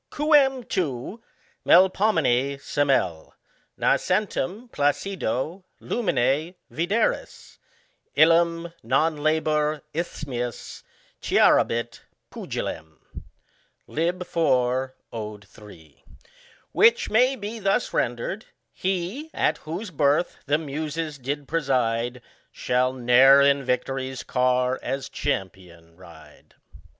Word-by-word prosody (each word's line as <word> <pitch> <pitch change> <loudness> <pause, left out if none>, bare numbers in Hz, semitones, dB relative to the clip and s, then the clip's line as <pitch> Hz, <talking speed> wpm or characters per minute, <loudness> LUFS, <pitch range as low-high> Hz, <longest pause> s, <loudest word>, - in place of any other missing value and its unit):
Qucm 280 -5 +3
tu, 170 - -3 0.4
Melpomene, 160 - +3
semel, 135 - -1 0.4
Nascentem 205 +3 0
placido 155 - -2 0.2
luminc 155 - 0 0.2
vidcris, 175 - -2 0.6
I - - +4
Ham 165 +1 +3
non 150 +7 +1
labor 155 0 0
isthmius 130 -7 -5 0.4
Clarabit 115 0 +2 0.3
Puqilem. 80 -1 -6 0.9
Lib. 175 +3 -2
iv. 130 -6 +1 0.2
Od. 105 -3 -7
3. 80 -11 -16 0.7
Which 235 +1 +4
may 250 +5 +4
be 220 0 -6
thus 200 +4 0
rendered: 120 - -2 0.3
He, 190 - -3
at 150 - +1
whose 180 +6 -6
birth 145 +2 +1
the 145 +1 +3
Muses 155 0 -4
did 140 +2 -4
preside, 125 -5 -1 0.3
Shall 125 +1 0
i^e'er 130 +3 +6
iu 140 - -8
victory's 130 +1 -2
car 125 0 +1
as 135 +2 -4
CHAMPION 90 -4 -5
ride. 80 -4 -17
145 Hz, 90 wpm, -24 LUFS, 125-175 Hz, 0.9 s, i^e'er